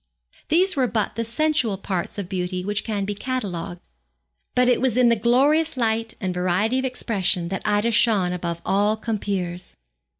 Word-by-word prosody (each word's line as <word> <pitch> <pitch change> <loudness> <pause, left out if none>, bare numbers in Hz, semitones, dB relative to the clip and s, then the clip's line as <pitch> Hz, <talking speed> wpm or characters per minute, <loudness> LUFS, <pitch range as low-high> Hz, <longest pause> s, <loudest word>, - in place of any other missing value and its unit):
These 365 +5 +3
were 260 -3 +2
but 220 -3 -1
the 230 - -2
sensual 240 -3 0
parts 190 -2 -3
of 200 -3 -4
beauty 180 -1 -3
which 205 +1 0
can 205 -3 -2
be 205 - -2
catalogued. 200 -7 -4 0.7
But 250 0 +4
it 250 - +3
was 255 -3 +1
in 250 -1 +5
the 235 - +4
glorious 275 +7 +2
light 225 -1 0
and 185 -2 -2
variety 185 +7 +1
of 265 - -2
expression 200 -8 -1
that 190 - -3
Ida 210 +2 +2
shone 205 -5 +3
above 170 -1 -4
all 205 +3 +2
compeers. 195 -5 -3
210 Hz, 170 wpm, -23 LUFS, 185-245 Hz, 0.7 s, in